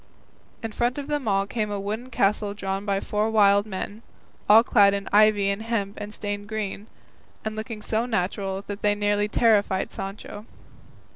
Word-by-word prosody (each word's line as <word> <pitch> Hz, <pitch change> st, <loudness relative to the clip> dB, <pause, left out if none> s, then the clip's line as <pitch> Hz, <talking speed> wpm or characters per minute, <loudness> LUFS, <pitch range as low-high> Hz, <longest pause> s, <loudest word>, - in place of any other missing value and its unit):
In 225 Hz, -, -3 dB
front 240 Hz, +4 st, -1 dB
of 285 Hz, -, -4 dB
them 295 Hz, -4 st, -2 dB
all 195 Hz, -1 st, +2 dB
came 210 Hz, 0 st, -2 dB
a 205 Hz, -1 st, -3 dB
wooden 215 Hz, +5 st, -4 dB
castle 205 Hz, -2 st, 0 dB
drawn 195 Hz, 0 st, -3 dB
by 195 Hz, -1 st, +1 dB
four 210 Hz, +1 st, -1 dB
wild 205 Hz, -1 st, +4 dB
men, 205 Hz, +2 st, -5 dB, 0.5 s
all 220 Hz, +2 st, +8 dB
clad 200 Hz, -4 st, +5 dB
in 200 Hz, 0 st, -4 dB
ivy 205 Hz, -1 st, +5 dB
and 200 Hz, +2 st, -3 dB
hemp 220 Hz, -3 st, -3 dB
stained 205 Hz, -1 st, -5 dB
green, 215 Hz, -1 st, -4 dB, 0.6 s
and 215 Hz, 0 st, -3 dB
looking 220 Hz, -1 st, -6 dB
so 225 Hz, +2 st, -1 dB
natural 195 Hz, -2 st, -2 dB
that 205 Hz, 0 st, -6 dB
they 205 Hz, 0 st, +2 dB
nearly 205 Hz, 0 st, +1 dB
terrified 210 Hz, -4 st, +2 dB
Sancho. 205 Hz, +2 st, -7 dB
205 Hz, 165 wpm, -25 LUFS, 200-220 Hz, 0.6 s, all